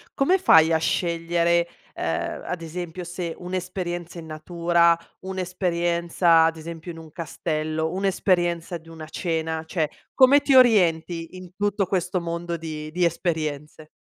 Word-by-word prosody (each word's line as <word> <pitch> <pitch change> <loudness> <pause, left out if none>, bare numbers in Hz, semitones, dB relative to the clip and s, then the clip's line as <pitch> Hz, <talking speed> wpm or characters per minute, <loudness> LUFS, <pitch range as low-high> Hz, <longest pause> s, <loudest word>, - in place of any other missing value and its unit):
Come 360 +8 +3
fai 160 - +6
a 160 - +3
scegliere, 170 0 +1 0.3
ehm, - - -3
ad 180 -2 -4
esempio 175 +2 -6
se 175 -1 -5
un'esperienza 180 -1 -4
in 165 - -8
natura, 170 +2 +2 0.2
un'esperienza 175 -2 +1
ad 165 0 0
esempio 165 +1 -8
in 165 - -10
un 160 -1 -12
castello, 160 -1 -3
un'esperienza 180 -3 0
di 165 +1 -17
una 160 -1 -9
cena. 160 -1 -2
Cioè 160 -1 -1 0.3
come 275 +2 +7
ti 275 - +3
orienti 175 -8 +3
in 185 -1 -11
tutto 205 0 0
questo 180 -1 -1
mondo 170 0 -4
di 155 -2 -6
di 175 +3 +1
esperienze? 155 -3 -3
170 Hz, 135 wpm, -24 LUFS, 160-180 Hz, 0.3 s, come